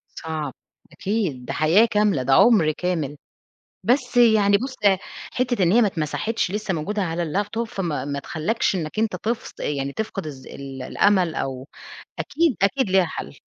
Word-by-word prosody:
صعب، 155 -4 -4 0.4
أكيد 190 - -2
ده 135 - -4
حياة 160 +10 +4
كاملة 210 -10 +2
ده 135 - +2
عُمر 185 - +5
كامل، 155 -4 -2 0.7
بس 250 0 +1
يعني 215 -4 +5
بُصّ، 260 +3 -5 0.6
حتة 245 -5 0
إن 175 +1 +4
هي 240 - +6
ما 215 - +4
اتمسحتش 185 +5 -1
لسه 205 -2 -2
موجودة 200 +7 -2
على 170 -1 -2
اللاب 195 +6 -2
توب 230 +1 -2
فما 165 -10 -3
ما 140 0 -3
تخلّكش 180 +9 -1
إنك 165 +3 -4
أنت 220 -4 +1
تف 225 +5 -3
يعني 140 -1 -2
تفقد 205 -2 -4
الذ 135 -4 -9
ال 135 -1 -8
الأمل 185 +3 +2
أو 135 0 -4 0.5
أكيد، 315 - +1
أكيد 225 +3 +2
ليها 185 -1 +4
حَلّ. 70 - -7
185 Hz, 165 wpm, -23 LUFS, 150-220 Hz, 0.7 s, هي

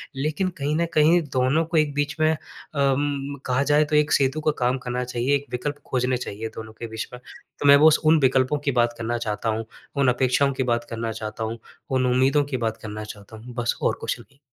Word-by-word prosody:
लेकिन 155 +7 -1
कहीं 145 +2 0
न 170 - +2
कहीं, 160 +3 +5
दोनों 130 +5 +2
को 165 +1 -1
एक 150 -2 +2
बीच 145 0 -1
में 155 0 +4
अम, 140 -2 -2
कहा 130 +2 +1
जाए, 150 +1 +5
तो 150 0 -1
एक 150 0 +2
सेतु 135 +3 +2
का 155 - +2
काम 125 +1 +2
करना 125 0 -2
चाहिए, 125 +3 0
एक 140 0 -2
विकल्प 145 +4 -3
खोजने 125 0 0
चाहिए 110 -2 -5
दोनों 110 -1 -8
के 115 - -5
बीच 110 0 -5
में। 125 - -8 0.4
तो 145 - +1
मैं 140 - +10
वो 155 +2 +7
उस 155 - +5
उन 155 +1 +6
विकल्पों 130 +2 +3
की - - +4
बात 120 0 +1
करना 115 +1 -2
चाहता 115 0 -2
हूँ, 110 +1 -2 0.3
उन 140 -1 +2
अपेक्षाओं 130 +2 +2
की 130 - -1
बात 120 0 -1
करना 115 0 -3
चाहता 110 0 -5
हूँ, 115 +1 -4 0.3
उन 130 -1 +1
उम्मीदों 135 +3 +3
की - - +2
बात 110 0 -3
करना 105 0 -7
चाहता 105 0 -10
हूँ। 120 +3 -11
बस, 120 -1 -1
और - - +1
कुछ - - -2
नहीं। 135 +4 -18
130 Hz, 230 wpm, -24 LUFS, 120-145 Hz, 0.4 s, मैं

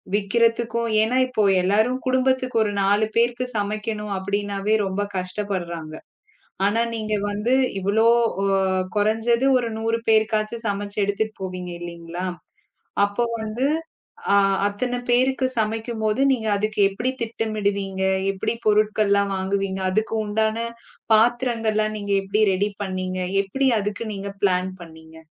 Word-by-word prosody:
விக்கிறதுக்கும். 230 +2 +1
ஏன்னா 240 +4 +1
இப்போ 220 -5 +1 0.2
எல்லாரும் 220 +7 +2
குடும்பத்துக்கு 255 -1 +1
ஒரு 205 - -2
4 205 +2 +3
பேருக்கு 240 +2 +1
சமைக்கணும் 210 0 -3
அப்படின்னாவே 200 +1 -1
ரொம்ப 190 +2 -2 0.2
கஷ்டப்படுறாங்க. 180 -4 -4 0.7
ஆனா 215 +3 +1
நீங்க 215 -1 -2 0.2
வந்து 210 +4 -1 0.3
இவ்வளோ 205 +4 +2 0.4
அ - - +1 0.5
குறைஞ்சது 225 +4 +2
ஒரு 235 - -2
100 225 +1 0
பேருக்காச்சு 215 0 +2
சமைச்சு 200 0 -4
எடுத்துட்டு 215 +2 -1
போவீங்க 180 -1 -5
இல்லீங்களா. 170 +1 -6 0.8
அப்போ 205 +4 0 0.2
வந்து 220 +4 -1 0.7
அ - - +6 0.3
அத்தனை 245 +5 -2
பேருக்கு 260 +1 +3
சமைக்கும்போது 220 +1 -1
நீங்க 230 -4 -2
அதுக்கு 215 +2 -2
எப்படி 235 +6 -2
திட்டம் 225 -1 -3
இடுவீங்க. 195 -1 -1 0.3
எப்படி 190 - -2
பொருட்கள் 215 0 +3
எல்லாம் 200 0 +2
வாங்குவீங்க. 195 0 -1
அதுக்குண்டான 220 +1 0 0.6
பாத்திரங்கள் 230 -1 +2
எல்லாம் 215 0 0
நீங்க 205 -1 -1
எப்படி 210 +3 +1
ரெடி 200 +3 0
பண்ணீங்க. 185 -1 -3 0.3
எப்படி 270 +8 0
அதுக்கு 205 +3 -3
நீங்க 200 0 -5
பிளான் 185 -1 +2
பண்ணீங்க. 160 -1 -13
215 Hz, 125 wpm, -23 LUFS, 195-225 Hz, 0.8 s, அ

